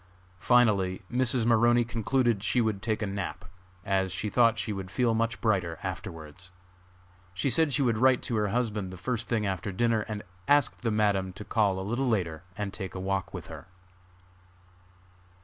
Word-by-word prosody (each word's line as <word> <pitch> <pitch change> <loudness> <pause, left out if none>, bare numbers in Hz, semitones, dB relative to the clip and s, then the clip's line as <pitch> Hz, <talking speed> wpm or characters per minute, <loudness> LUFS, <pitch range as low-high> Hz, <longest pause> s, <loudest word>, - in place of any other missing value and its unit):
Finally 100 -5 +3
Mrs. 125 -1 +1
Maroney 120 +1 +4
concluded 120 -1 0
she 125 - +1
would 110 -4 0
take 110 0 -1
a - - +1
nap, 100 -1 -5 0.4
as 95 -1 +1
she 105 +3 -3
thought 115 0 +4
she 110 -3 -2
would 95 -2 -6
feel 120 +2 +1
much 115 0 -1
brighter 95 -7 0
afterwards. 90 -3 -7 0.9
She 130 +8 0
said 160 +4 +3
she 140 - +1
would 115 -4 +1
write 130 0 +4
to 120 - -2
her 105 -1 +1
husband 105 -3 -1
the 95 - -9
first 120 +4 -2
thing 110 -3 0
after 95 0 -2
dinner, 115 +3 +1
and 105 -1 -5 0.2
asked 145 -2 +3
the 120 - 0
Madam 100 -3 +1
to 105 +3 -9
call 100 -4 +1
a 95 - -4
little 120 +6 -1
later 85 -8 -1 0.2
and 100 -2 -3
take 95 -3 -6
a - - -4
walk 95 0 -2
with - - -7
her. - - -10
105 Hz, 180 wpm, -28 LUFS, 95-120 Hz, 0.9 s, Maroney